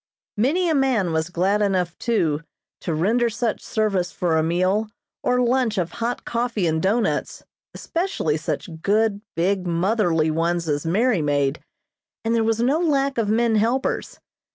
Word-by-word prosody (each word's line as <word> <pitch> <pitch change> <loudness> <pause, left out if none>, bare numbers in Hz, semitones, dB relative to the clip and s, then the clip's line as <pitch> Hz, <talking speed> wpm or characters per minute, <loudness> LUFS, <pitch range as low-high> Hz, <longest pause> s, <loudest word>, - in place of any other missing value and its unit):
Many 295 - +1
a 325 - +2
man 255 - +1
was 160 +1 0
glad 190 +4 +1
enough, 185 -4 0
too, 165 -11 0 0.4
to 165 - -3
render 230 +9 +2
such 230 0 -2
service 195 -5 -1
for 170 -3 0
a 160 - +3
meal 185 +6 +1 0.3
or 250 0 +2
lunch 245 -3 +1
of 175 -2 -1
hot 235 +4 -3
coffee 235 -4 -1
and 160 -1 +1
doughnuts, 220 +6 0 0.3
especially 335 - -1
such 160 +1 -5
good, 205 +1 +1
big, 185 +2 0
motherly 170 -3 +1
ones 170 +1 0
as 145 +1 -1
Mary 210 +2 +2
made, 145 -1 0 0.7
and 225 - +1
there 230 -1 +2
was 225 0 +1
no 270 +6 +2
lack 275 -6 +1
of 215 -3 0
men 225 0 +2
helpers. 235 +5 -1
205 Hz, 155 wpm, -23 LUFS, 170-235 Hz, 0.7 s, a